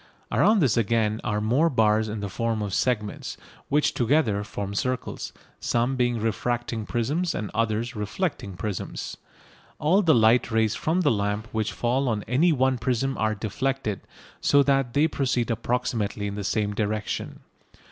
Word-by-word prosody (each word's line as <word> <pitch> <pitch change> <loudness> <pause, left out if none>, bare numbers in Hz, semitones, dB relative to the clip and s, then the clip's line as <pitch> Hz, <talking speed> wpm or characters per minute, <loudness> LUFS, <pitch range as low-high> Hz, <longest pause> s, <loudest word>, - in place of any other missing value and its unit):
Around 215 -2 +4
this 130 -8 +3
again 110 0 +1
are 105 -2 0
more 125 +10 +2
bars 110 -4 +2
in 105 0 -4
the 100 - -2
form 110 +2 -1
of 100 -2 -4
segments, 110 -4 -1 0.3
which 150 +1 +2
together 115 -5 +2
form 100 -1 -5
circles, 125 +5 -3 0.3
some 120 +3 0
being 120 -1 +1
refracting 115 0 -2
prisms 150 +10 -1
and 105 - -4
others 115 +2 -1
reflecting 105 - -3
prisms. 100 0 -4 0.6
All 175 +7 +3
the 165 -5 +4
light 115 +2 +4
rays 110 -1 +2
from 165 +9 0
the - - +3
lamp 105 0 -1
which 110 -1 -1
fall 125 +2 0
on 105 -3 -1
any 150 +9 +3
one 130 -3 +2
prism 130 +3 0
are 110 0 +1
deflected, 110 0 -2 0.4
so 140 0 +5
that 135 -3 +1
they 150 +3 +4
proceed 125 -5 0
approximately 115 -3 -1
in 100 - -3
the 100 0 -4
same 105 +1 0
direction. 105 0 -3
115 Hz, 155 wpm, -25 LUFS, 105-130 Hz, 0.6 s, so